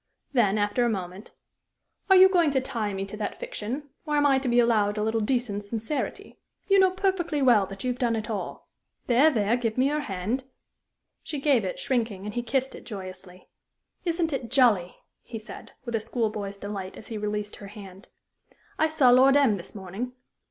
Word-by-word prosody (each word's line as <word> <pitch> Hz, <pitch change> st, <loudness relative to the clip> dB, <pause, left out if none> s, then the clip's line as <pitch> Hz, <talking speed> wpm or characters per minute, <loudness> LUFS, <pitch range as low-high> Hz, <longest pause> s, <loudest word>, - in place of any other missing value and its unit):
Then, 215 Hz, -5 st, +3 dB
after 205 Hz, +4 st, +1 dB
a 240 Hz, -, +2 dB
moment: 190 Hz, -1 st, -5 dB, 0.8 s
"Are 385 Hz, -, +8 dB
you 375 Hz, 0 st, +9 dB
going 350 Hz, -5 st, +3 dB
to 275 Hz, -2 st, +2 dB
tie 230 Hz, -5 st, -3 dB
me 195 Hz, 0 st, -3 dB
to 195 Hz, -, -8 dB
that 210 Hz, -, -4 dB
fiction, 290 Hz, -, -5 dB
or 300 Hz, -2 st, -1 dB
am 290 Hz, -, +3 dB
I 270 Hz, -2 st, +4 dB
to 265 Hz, -1 st, -2 dB
be 240 Hz, 0 st, +4 dB
allowed 215 Hz, -3 st, +3 dB
a 210 Hz, -, 0 dB
little 220 Hz, +1 st, 0 dB
decent 215 Hz, -3 st, -1 dB
sincerity? 225 Hz, +7 st, -4 dB, 0.3 s
You 395 Hz, -1 st, +5 dB
know 380 Hz, -1 st, +6 dB
perfectly 370 Hz, -5 st, -1 dB
well 225 Hz, -7 st, +5 dB
that 195 Hz, 0 st, -8 dB
you 255 Hz, -, 0 dB
have 245 Hz, -, -6 dB
done 235 Hz, -2 st, +1 dB
it 220 Hz, -1 st, -3 dB
all. 215 Hz, -3 st, -5 dB, 0.4 s
There, 260 Hz, +6 st, +5 dB
there; 225 Hz, -5 st, +1 dB
give 230 Hz, -2 st, -2 dB
me 260 Hz, +2 st, +3 dB
your 300 Hz, +1 st, 0 dB
hand." 225 Hz, +1 st, -3 dB, 0.8 s
She 295 Hz, -, -5 dB
gave 275 Hz, -5 st, +3 dB
it, 185 Hz, -, -3 dB
shrinking, 225 Hz, -6 st, -2 dB
and 210 Hz, -, -5 dB
he 240 Hz, -, -1 dB
kissed 260 Hz, +3 st, -1 dB
it -, -, -10 dB
joyously. 185 Hz, -3 st, -9 dB, 0.6 s
"Isn't 335 Hz, -2 st, 0 dB
it 245 Hz, -4 st, -3 dB
jolly!" 230 Hz, -10 st, +3 dB, 0.3 s
he 230 Hz, -, -8 dB
said, 215 Hz, -, -10 dB
with 235 Hz, -, -5 dB
a 225 Hz, -, +1 dB
school 225 Hz, 0 st, -1 dB
boy's 200 Hz, -2 st, -5 dB
delight 200 Hz, -2 st, -6 dB
as 220 Hz, -, -11 dB
he 225 Hz, -, -4 dB
released 210 Hz, 0 st, -3 dB
her 200 Hz, -, -10 dB
hand. 195 Hz, 0 st, -12 dB, 0.7 s
"I 315 Hz, -, +4 dB
saw 295 Hz, -6 st, +4 dB
Lord 265 Hz, +3 st, +6 dB
M 260 Hz, -8 st, +4 dB
this 180 Hz, +3 st, -10 dB
morning." 200 Hz, +6 st, -5 dB
230 Hz, 200 wpm, -26 LUFS, 205-270 Hz, 0.8 s, you